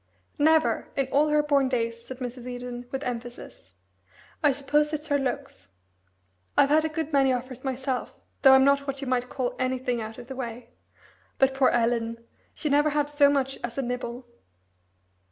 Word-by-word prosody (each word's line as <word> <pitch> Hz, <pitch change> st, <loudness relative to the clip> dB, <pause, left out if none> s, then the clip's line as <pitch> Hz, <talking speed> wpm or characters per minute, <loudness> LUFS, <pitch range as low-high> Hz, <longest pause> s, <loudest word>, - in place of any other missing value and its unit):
"Never 315 Hz, +2 st, +3 dB
in 275 Hz, -, +2 dB
all 295 Hz, +2 st, +4 dB
her 300 Hz, 0 st, +3 dB
born 280 Hz, -3 st, +2 dB
days," 230 Hz, -2 st, -2 dB
said 260 Hz, -, -8 dB
Mrs. 250 Hz, -1 st, -6 dB
Eden, 245 Hz, 0 st, -6 dB
with 270 Hz, +1 st, -3 dB
emphasis. 245 Hz, -1 st, -7 dB, 0.7 s
"I 295 Hz, -3 st, +5 dB
suppose 295 Hz, +2 st, +1 dB
it's 305 Hz, +1 st, -4 dB
her 285 Hz, -1 st, +2 dB
looks. 270 Hz, -, -4 dB, 0.9 s
I've 275 Hz, -, +5 dB
had 310 Hz, +1 st, +5 dB
a 315 Hz, -, 0 dB
good 315 Hz, 0 st, -4 dB
many 270 Hz, -1 st, +4 dB
offers 255 Hz, 0 st, -4 dB
myself, 265 Hz, -1 st, -2 dB, 0.3 s
though 270 Hz, -2 st, +8 dB
I'm 265 Hz, 0 st, +7 dB
not 280 Hz, 0 st, +3 dB
what 275 Hz, 0 st, -4 dB
you 275 Hz, -, -4 dB
might 250 Hz, -1 st, 0 dB
call 255 Hz, -2 st, -2 dB
anything 255 Hz, -2 st, -1 dB
out 220 Hz, 0 st, -7 dB
of -, -, -9 dB
the 265 Hz, +1 st, -8 dB
way 245 Hz, -2 st, -6 dB, 0.7 s
but 270 Hz, 0 st, +3 dB
poor 265 Hz, -1 st, +4 dB
Ellen 230 Hz, -1 st, 0 dB, 0.5 s
never 295 Hz, +1 st, +3 dB
had 295 Hz, 0 st, 0 dB
so 290 Hz, -1 st, +5 dB
much 270 Hz, -1 st, 0 dB
as 240 Hz, +1 st, -5 dB
a 275 Hz, -, 0 dB
nibble." 245 Hz, 0 st, -4 dB
265 Hz, 175 wpm, -26 LUFS, 245-285 Hz, 0.9 s, though